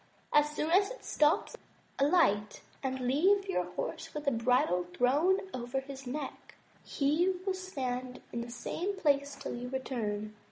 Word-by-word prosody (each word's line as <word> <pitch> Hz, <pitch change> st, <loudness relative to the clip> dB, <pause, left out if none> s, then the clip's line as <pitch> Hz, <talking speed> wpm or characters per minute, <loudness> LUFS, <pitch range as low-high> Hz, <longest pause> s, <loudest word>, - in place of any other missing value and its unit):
As 295 Hz, 0 st, +5 dB
soon 300 Hz, +1 st, -2 dB
as 395 Hz, +3 st, +5 dB
it -, -, -9 dB
stops, 300 Hz, -4 st, +2 dB, 0.4 s
alight, 275 Hz, -, +3 dB, 0.2 s
and 260 Hz, -1 st, -2 dB
leave 370 Hz, +11 st, +3 dB
your 380 Hz, -, 0 dB
horse -, -, -5 dB
with 300 Hz, 0 st, -4 dB
the 280 Hz, -, +3 dB
bridle 230 Hz, -7 st, +2 dB
thrown 300 Hz, +10 st, +3 dB
over 250 Hz, +1 st, -2 dB
his 270 Hz, -1 st, -9 dB
neck; 275 Hz, +2 st, -6 dB, 0.3 s
he 315 Hz, +7 st, +1 dB
will 385 Hz, -, +1 dB
stand 255 Hz, -9 st, -4 dB
in 235 Hz, -, -2 dB
the 235 Hz, -, -6 dB
same 335 Hz, +11 st, -3 dB
place 285 Hz, -5 st, +1 dB
till 275 Hz, 0 st, -5 dB
you 245 Hz, +1 st, -5 dB
return. 215 Hz, -5 st, -3 dB
275 Hz, 155 wpm, -32 LUFS, 245-330 Hz, 0.4 s, As